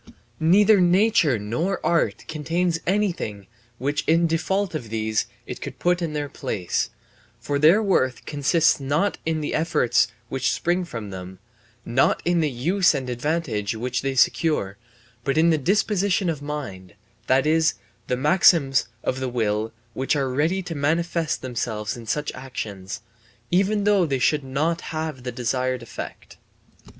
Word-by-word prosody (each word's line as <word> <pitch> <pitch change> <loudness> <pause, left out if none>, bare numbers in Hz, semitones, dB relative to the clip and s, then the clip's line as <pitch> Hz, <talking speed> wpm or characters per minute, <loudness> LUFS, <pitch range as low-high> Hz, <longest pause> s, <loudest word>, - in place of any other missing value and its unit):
Neither 195 +5 +5
nature 180 - +4
nor 120 - -2
art 170 - +1
contains 165 +2 -1
anything 175 - -1 0.3
which 145 +4 -1
in 165 +2 +4
default 175 +4 0
of 125 -8 -5
these 110 -1 -1 0.2
it - - -7
could - - -6
put 175 0 +1
in 165 -3 -2
their 145 -1 -2
place, 110 - -2 0.5
for 140 +4 -2
their 170 +9 +6
worth 130 -10 +1
consists 150 +2 +2
not 150 +9 0
in 160 -1 0
the 150 - -3
effects 140 -7 +2 0.2
which 130 +1 0
spring 175 +1 0
from 115 -10 -7
them, 95 0 -8 0.5
not 130 +3 +2
in 175 0 +2
the 155 -2 +2
use 170 +9 +2
and 130 -2 -3
advantage 120 -6 -1
which 125 +2 -2
they 135 0 -2
secure, 130 - +2 0.5
but 135 +3 0
in 165 +1 +5
the 160 - +2
disposition 195 +2 +1
of 150 -3 -6
mind, 125 -11 -6 0.3
that 130 +2 +3
is, 155 0 +3 0.3
the 125 - 0
maxims 150 -1 +4 0.2
of 130 - -1
the 130 -1 -2
will 110 -2 -1 0.2
which 130 +5 0
are 135 -3 0
ready 160 +8 0
to 175 - -5
manifest 165 +2 0
themselves 110 -4 -3
in 115 -2 -10
such 150 +5 -1
actions, 105 -7 -6 0.5
even 200 +3 +2
though 200 -4 +3
they 135 -2 0
should 145 +3 +2
not 155 +6 -1
have 155 -4 -4
the 125 0 -4
desired 125 +1 -1
effect. 115 - -9
150 Hz, 155 wpm, -24 LUFS, 125-170 Hz, 0.5 s, their